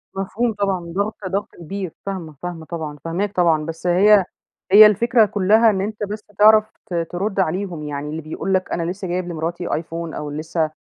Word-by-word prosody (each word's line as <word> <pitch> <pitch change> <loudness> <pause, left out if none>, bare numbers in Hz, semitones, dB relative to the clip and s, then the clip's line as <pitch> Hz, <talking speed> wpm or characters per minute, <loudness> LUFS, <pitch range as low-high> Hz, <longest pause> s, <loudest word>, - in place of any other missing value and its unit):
مفهوم 215 +5 -1
طبعًا 200 -2 -1
ضاغطة 200 +1 -3
ضغط 200 +3 -2
كبير 185 +1 -6
فاهمة، 180 -6 -5
فاهمة 175 -2 -5
طبعًا، 155 -3 -6
فاهماك 190 +5 -2
طبعًا، 165 -4 +2
بس 165 +2 -5
هي 195 +2 +5 0.5
هي 210 +2 +10
الفكرة 225 +2 +4
كلها 210 +3 +4
إن 195 -3 0
أنت 210 +1 -4
بس 210 +1 -4 0.2
تعرف 215 0 +6
ت - - -9
ترد 175 +4 -2
عليهم 180 -2 -1
يعني 145 0 -5
اللي 160 +2 -4
بيقول 160 +5 -3
لك 185 0 0
أنا 170 0 -1
لسه 190 0 -6
جايب 180 0 -2
لمراتي 170 +1 -3
آيفون، 165 0 -4
أو 150 0 -5
لسه 155 +1 -2
185 Hz, 180 wpm, -21 LUFS, 165-205 Hz, 0.5 s, هي